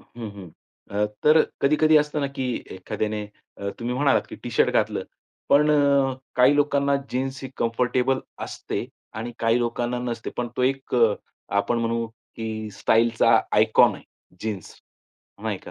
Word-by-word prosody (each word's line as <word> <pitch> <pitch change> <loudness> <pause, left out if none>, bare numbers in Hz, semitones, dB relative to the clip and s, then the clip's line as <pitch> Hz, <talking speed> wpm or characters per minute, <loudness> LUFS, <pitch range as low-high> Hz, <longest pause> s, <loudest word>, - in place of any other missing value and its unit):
हं, 115 -3 -9
हं. 95 -4 -11 0.4
अ, 105 +1 +1 0.2
तर 155 +1 +7 0.2
कधी-कधी 155 +2 +4
असतं 150 0 -1
ना 140 - 0
की 130 - -2 0.3
एखाद्याने 105 +3 -3 0.3
अ, 100 - -3
तुम्ही 120 +1 -2
म्हणालात 140 +1 +3
की - - -8
टी-शर्ट - - +2
घातलं. - - +1 0.5
पण 150 +2 +5
अ, - - +5 0.6
काही 125 +3 +6
लोकांना 140 -1 +2 0.2
जीन्स 130 +1 -2
ही 135 - -5
कम्फर्टेबल 125 +3 +1 0.3
असते - - -5 0.3
आणि 115 +2 -5
काही 115 +1 +2
लोकांना 120 +1 -1
नसते. 120 -2 -4
पण 120 -1 -2
तो - - 0
एक 135 +1 0
अ, 115 -4 +4 0.4
आपण 115 +4 +1
म्हणू 115 0 -1
की 110 -1 -7
स्टाईलचा 115 +2 +3 0.2
आयकॉन - - +5
आहे - - -12 0.4
जीन्स 105 -4 -5 0.7
नाही - - -2
का? - - -12
120 Hz, 155 wpm, -24 LUFS, 115-135 Hz, 0.7 s, तर